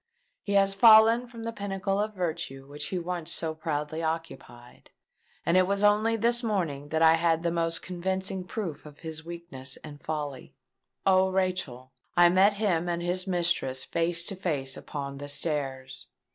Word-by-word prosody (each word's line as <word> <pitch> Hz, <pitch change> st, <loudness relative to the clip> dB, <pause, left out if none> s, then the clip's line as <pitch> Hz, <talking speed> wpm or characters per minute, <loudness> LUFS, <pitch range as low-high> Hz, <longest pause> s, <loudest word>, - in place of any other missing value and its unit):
He 200 Hz, -, -3 dB
has 195 Hz, 0 st, +4 dB
fallen 225 Hz, +3 st, +7 dB
from 235 Hz, -1 st, -10 dB
the 230 Hz, 0 st, -4 dB
pinnacle 195 Hz, -1 st, -2 dB
of 210 Hz, 0 st, -2 dB
virtue 160 Hz, -7 st, -4 dB
which 145 Hz, +2 st, -5 dB
he 185 Hz, -, -3 dB
once 175 Hz, -1 st, -3 dB
so 160 Hz, -1 st, -2 dB
proudly 155 Hz, 0 st, -3 dB
occupied; 160 Hz, -7 st, -6 dB, 0.6 s
and 170 Hz, -, +2 dB
it 185 Hz, 0 st, +5 dB
was 200 Hz, +1 st, 0 dB
only 210 Hz, +2 st, +4 dB
this 235 Hz, +2 st, +2 dB
morning 170 Hz, -, -2 dB
that 160 Hz, +1 st, +1 dB
I 160 Hz, 0 st, +7 dB
had 165 Hz, 0 st, +2 dB
the 170 Hz, -, +1 dB
most 165 Hz, -1 st, 0 dB
convincing 190 Hz, +1 st, -2 dB
proof 180 Hz, -9 st, -5 dB
of 145 Hz, -1 st, -15 dB
his 160 Hz, -1 st, -6 dB
weakness 165 Hz, -6 st, -6 dB
and 145 Hz, -2 st, -10 dB
folly! 145 Hz, -4 st, -5 dB, 0.5 s
O 190 Hz, -1 st, +4 dB
Rachel—I 175 Hz, -3 st, 0 dB
met 190 Hz, +4 st, +5 dB
him 180 Hz, -5 st, 0 dB
and 170 Hz, 0 st, -2 dB
his 180 Hz, +2 st, 0 dB
mistress 170 Hz, -8 st, 0 dB
face 170 Hz, +1 st, 0 dB
to 195 Hz, -, -3 dB
face 145 Hz, -8 st, -2 dB
upon 140 Hz, -2 st, -6 dB
the 145 Hz, +1 st, -7 dB
stairs! 135 Hz, -3 st, -3 dB
170 Hz, 165 wpm, -28 LUFS, 150-195 Hz, 0.6 s, fallen